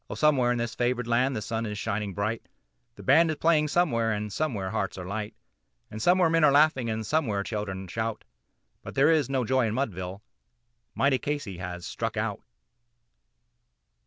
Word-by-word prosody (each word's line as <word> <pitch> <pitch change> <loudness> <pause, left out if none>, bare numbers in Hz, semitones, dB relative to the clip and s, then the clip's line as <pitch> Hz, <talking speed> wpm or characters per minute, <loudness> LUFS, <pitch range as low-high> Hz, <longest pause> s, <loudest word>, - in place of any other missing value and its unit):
Oh! - - -4
somewhere 135 -5 +3
in 120 - 0
this 115 -1 -2
favored 125 0 0
land 125 +3 +1
the 105 - -3
sun 115 -2 -2
is 105 0 -5
shining 100 -2 -3
bright, 110 +3 -1 0.5
The - - -12
band 165 0 +5
is 155 - 0
playing 155 -1 +3
somewhere, 130 -9 +1
and 105 -1 -3
somewhere 105 -12 -2
hearts 100 -3 -2
are 90 - -6
light, 105 +3 -4 0.6
And 110 - -6
somewhere 180 +5 +4
men 165 0 +2
are 150 - +6
laughing, 140 -4 +4
and 110 0 -2
somewhere 110 -7 0
children 100 -3 -4
shout; 110 +4 -3 0.6
But - - -9
there 140 +4 +5
is 155 -5 +2
no 130 -3 0
joy 130 0 +2
in 110 - -2
Mudville 95 -6 -3 0.7
mighty 135 -2 +2
Casey 145 -11 -4
has 90 -1 -6
"Struck - - -4
Out." - - -2
115 Hz, 180 wpm, -27 LUFS, 105-145 Hz, 0.7 s, are